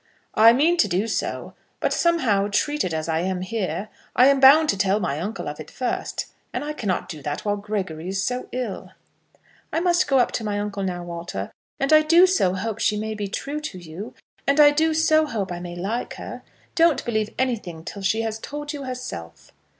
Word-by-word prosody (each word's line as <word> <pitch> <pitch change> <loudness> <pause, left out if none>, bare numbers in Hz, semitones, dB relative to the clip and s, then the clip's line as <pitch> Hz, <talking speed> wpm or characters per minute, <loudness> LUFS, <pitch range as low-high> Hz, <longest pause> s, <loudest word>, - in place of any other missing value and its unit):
"I 225 +1 +8
mean 310 +8 +3
to 335 - +4
do 185 +5 0
so. - - -3 0.3
But - - 0
somehow, 255 - +2
treated 295 - 0
as 160 0 -2
I 160 -1 0
am 185 +1 -1
here, 210 +1 -3 0.3
I 255 +2 +7
am 280 -1 +3
bound 285 +4 +8
to - - +2
tell 195 +2 +2
my 155 -7 -2
uncle 205 +7 -4
of 145 +1 -5
it 155 - -8
first. 255 - -3 0.3
And - - -3
I 300 +1 -3
cannot 205 -10 -2
do 155 -5 -8
that 145 +5 -4
while 205 -1 +1
Gregory 190 -6 -4
is 195 +1 -1
so 250 0 -3
ill." 245 -5 -5 0.8
"I - - 0
must 345 0 +2
go 270 - +3
up 245 - +3
to 230 - -3
my 205 -1 -2
uncle 205 -1 -3
now, 180 -2 -3
Walter. 170 - -5 0.3
And 275 +3 +2
I 310 - +8
do 335 +4 +6
so 275 - +2
hope 220 +3 -3
she 210 - +1
may 220 +1 -3
be 210 -1 -4
true 280 +9 -4
to 300 -11 -6
you. 180 +7 -9 0.3
And 280 +2 +3
I 295 -1 +9
do 315 +2 +2
so 315 -1 +4
hope 205 -8 -3
I 175 - -4
may 175 0 -7
like 205 +7 -3
her. - - -8 0.3
Don't 335 -3 +3
believe 220 -2 -1
anything 215 -11 -2
till 200 - -7
she 220 +4 +1
has 220 -1 -3
told 295 +4 -6
you 280 -2 -6
herself." 250 - -7
215 Hz, 210 wpm, -23 LUFS, 185-280 Hz, 0.8 s, I